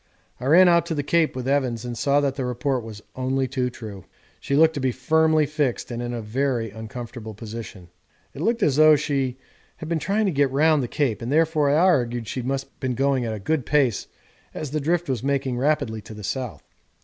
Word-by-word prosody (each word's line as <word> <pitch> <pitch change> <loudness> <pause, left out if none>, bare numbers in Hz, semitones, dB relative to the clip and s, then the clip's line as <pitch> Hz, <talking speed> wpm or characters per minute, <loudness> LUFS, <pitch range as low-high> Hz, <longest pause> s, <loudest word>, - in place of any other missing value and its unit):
I 125 - -6
ran 180 +5 +7
out 170 -1 +4
to 165 - -2
the 145 - -1
Cape 160 +1 +1
with 130 0 -4
Evans 130 -4 0
and 120 -1 -4
saw 140 +4 +2
that 140 -2 0
the 135 -1 -4
report 125 +1 -1
was 110 -2 -9
only 130 +1 0
too 130 -1 -1
true. 110 -6 -9 0.4
She 140 - -2
looked 160 +2 +5
to 145 - -4
be 130 -1 +1
firmly 155 +4 +2
fixed 145 -5 -2
and 120 0 -4
in 120 0 -3
a 120 -2 -4
very 120 0 -1
uncomfortable 110 0 -8
position. 105 -4 -8 0.5
It 140 - -8
looked 230 +4 +1
as 140 -5 +2
though 155 0 +7
she 135 -3 -1 0.4
had 160 - -7
been 165 0 0
trying 205 +8 0
to 195 - +1
get 140 -3 +2
round 150 +2 +3
the 125 - -2
Cape, 125 -6 -1
and 120 +3 -4
therefore 155 -1 +3
I 145 - +3
argued 120 - +2
she 130 - -3
must 135 +2 -2
have 135 - -31
been 130 -2 -2
going 135 -2 +1
a 110 -1 -3
good 145 +8 -1
pace 130 -5 +1 0.5
as 150 -4 -5
the 155 0 -1
drift 170 +3 0
was 130 -5 -1
making 135 -2 -1
rapidly 140 -6 0
to 110 +1 -11
the 105 - -9
south. 110 - -4
135 Hz, 220 wpm, -24 LUFS, 120-150 Hz, 0.5 s, ran